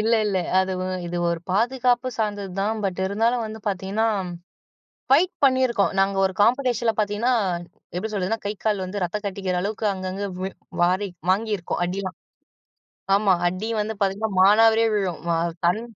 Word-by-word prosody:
இல்ல, 225 +2 +1
இல்ல. 195 -2 +1 0.2
அது 190 0 +1 0.3
இது 175 - -4
ஒரு 170 -1 -2
பாதுகாப்பு 245 +4 +2
சார்ந்தது 205 -3 -2
தான். 220 +2 0
பட் 190 -1 -2
இருந்தாலும் 230 +4 +1
வந்து 220 +1 -7
பார்த்தீங்கன்னா, 195 +3 -1 1.0
ஃபைட் 340 +7 +5
பண்ணியிருக்கோம். 255 -7 +3
நாங்க 195 0 +2
ஒரு 190 - +1
காம்படிஷன்ல 240 -1 +2
பார்த்தீங்கன்னா, 215 +4 +1 0.6
எப்படி 200 +5 -3
சொல்றதுனா 200 +3 -1
கை, 205 - 0
கால் 210 -3 +1
வந்து 190 +1 -4
ரத்தம் 210 +4 -4
கட்டிக்கிற 190 -2 -2
அளவுக்கு 215 +2 -2
அங்கங்கே 190 +1 -4 0.5
வாரி 185 +3 +2 0.2
வாங்கியிருக்கோம் 200 -3 -1
அடிலா 185 +1 -3 1.0
ஆமா 200 -2 +4
அடி 185 +5 -3
வந்து 215 +1 -1
பார்த்தீங்கன்னா, 200 +2 0
மானாவாரியா 225 +3 +5
விழும். 185 -6 -1
ஆ - - +1 0.3
கண் 180 +6 +2
205 Hz, 145 wpm, -24 LUFS, 190-225 Hz, 1.0 s, ஃபைட்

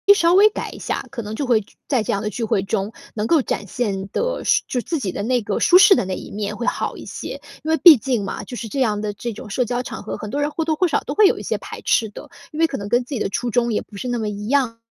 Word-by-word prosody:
稍 340 -2 +3
微 410 +3 +8
改 - - -5
一 - - -10
下， - - -3
可 250 -4 -5
能 210 +1 -5
就 275 +2 -3
会 235 -3 +4
聚 200 - -20
在 255 -6 +1
这 - - -1
样 200 - -1
的 210 - -2
聚 215 +4 -4
会 205 -3 +1
中 195 +2 -2 0.2
能 210 - -1
够 315 +5 +4
展 205 - -3
现 195 -3 -2
得 - - -2
是 - - +3
就 250 - -1
自 325 +5 -3
己 200 -8 -2
的 200 - -4
那 245 +2 +1
个 205 -2 -2
舒 360 - +6
适 405 0 +8
的 195 - 0
那 185 - -3
一 - - -8
面 210 0 -3
会 240 +2 -4
好 - - -1
一 - - -9
些。 - - -7 0.2
因 315 - -1
为 320 - +3
毕 325 -4 +9
竟 240 -2 -1
嘛， 195 - -5
就 245 - -8
是 235 -2 -5
这 275 - -3
样 210 -4 +1
的 210 - -2
这 230 +3 -5
种 215 +1 -10
社 245 +5 0
交 245 +1 -1
场 235 -4 -7
合。 - - -5
很 210 - -7
多 285 - -2
人 295 +1 0
或 325 - -2
多 315 0 0
或 365 +4 +2
少 - - +1
都 - - -4
会 420 -1 +7
有 - - +1
一 - - -7
些 - - -1
排 - - -9
斥 225 - +2
的， 205 - -11 0.2
因 305 - -7
为 330 - +5
可 270 - -4
能 200 - -6
跟 240 +4 +2
自 255 +3 -6
己 230 - -2
的 - - 0
初 240 +5 -2
衷 235 0 +1
也 - - 0
不 205 - -13
是 250 - -5
那 245 -1 -1
么 215 - -2
一 205 0 -6
样 255 -3 +1
235 Hz, 350 characters per minute, -21 LUFS, 210-280 Hz, 0.2 s, 毕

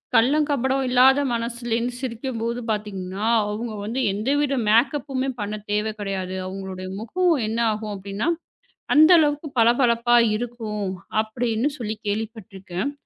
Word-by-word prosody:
கல்லம் 290 +6 +4
கபடமும் 265 -1 +1
இல்லாத 260 +2 +6
மனசுல 235 0 -3
இருந்து 240 +2 -1
சிரிக்கும்போது 235 -1 -3
பார்த்தீங்கன்னா, 200 -2 -4 0.2
அவங்க 220 +2 -4
வந்து 230 +5 -3
எந்தவித 275 +7 0
மேக்கப்புமே 270 +3 +2
பண்ண 210 +1 -3
தேவை 210 +1 0
கிடையாது. 190 -2 -3
அவங்களுடைய 190 -1 -6
முகம் 350 +11 +1
என்ன 225 +2 -2
ஆகும் 210 0 -5
அப்படின்னா, 200 - -3 0.7
அந்த 310 +2 +8
அளவுக்கு 295 0 +1
பளபளப்பா 235 0 +4 0.2
இருக்கும் 220 -3 -4 0.4
அப்படின்னு 230 +2 -1
சொல்லிப் 220 -1 -5
கேள்விப்பட்டிருக்கேன். 205 0 -4
230 Hz, 120 wpm, -23 LUFS, 210-260 Hz, 0.7 s, அந்த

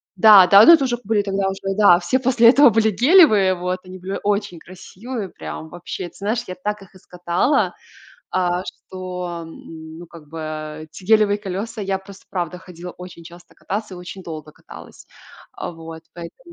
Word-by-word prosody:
да 195 -1 +7
да, 200 +3 +8
но 335 - +9
это 320 -4 +4
уже 240 -2 -1
были 210 0 +1
тогда 195 -1 -2
уже, 195 0 -4
да, 200 -5 +6
все 260 - 0
после 245 -2 +4
этого 280 +2 +6
были 220 0 +2
гелевые. 220 - +5
Вот 180 +1 -3
они 185 0 -11
были 190 +2 -5
очень 205 -3 -1
красивые, 195 +5 -8
прям 160 - -9
вообще. 175 +2 -7
Ты - - -28
знаешь, 220 +4 -2
я 185 - -6
так 210 +3 -4
их 195 0 -17
и - - -13
скатала, 180 - -1 0.6
а, 180 -1 -1
что, 180 -3 -7
ну, 160 +1 -12
как 165 -3 -15
бы, 165 +2 -9
э, 155 0 -6
эти 160 +4 -14
гелевые 210 0 +3
колеса, 205 +3 -6
я 195 -1 -2
просто, 190 0 -15
правда, 180 -1 -4
ходила 180 -1 -10
очень 180 -1 -12
часто 175 +1 -15
кататься 205 -1 -5
и - - -10
очень 180 +2 -10
долго 155 -3 -9
каталась. - - -14 0.5
Вот, 165 -1 -8
поэтому. 175 - -12
185 Hz, 180 wpm, -20 LUFS, 175-210 Hz, 0.6 s, но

